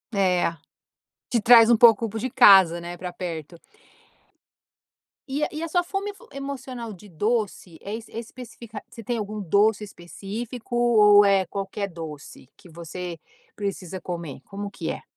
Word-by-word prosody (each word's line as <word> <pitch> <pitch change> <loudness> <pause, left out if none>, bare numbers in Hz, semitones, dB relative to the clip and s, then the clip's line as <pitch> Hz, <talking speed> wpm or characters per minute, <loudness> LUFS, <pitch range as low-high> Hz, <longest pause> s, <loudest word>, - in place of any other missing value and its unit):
É. 180 -3 +1 0.7
Te 235 -3 +1
traz 230 -1 +8
um 235 - +6
pouco 230 0 +6
pro 220 +1 -5
de 255 - -3
casa, 190 -8 +7
né, 175 +1 -7
pra 180 0 -6
perto. 170 -2 -6 1.7
E 275 +2 -3
a - - +2
e 310 +1 -5
a - - -2
sua 355 +2 +1
fome 390 +3 -4
ev 400 - -20 0.2
emocional 265 -4 -6
de 205 +1 -13
doce 205 -2 -2
é 205 - -6
é 225 0 -8
especifica 235 -2 -10
você 230 - -11
tem 240 +2 -2
algum 210 0 -5
doce 205 +3 +2
específico 210 +6 -7
ou 215 -4 +6
é 195 -2 +3
qualquer 200 +1 -4
doce 155 -6 -10
que 180 - -17
você 170 +1 -7 0.4
precisa 190 -3 -5
comer? 170 -7 -6
Como 200 +1 -7
que - - -6
é? - - -7
205 Hz, 160 wpm, -24 LUFS, 180-235 Hz, 1.7 s, traz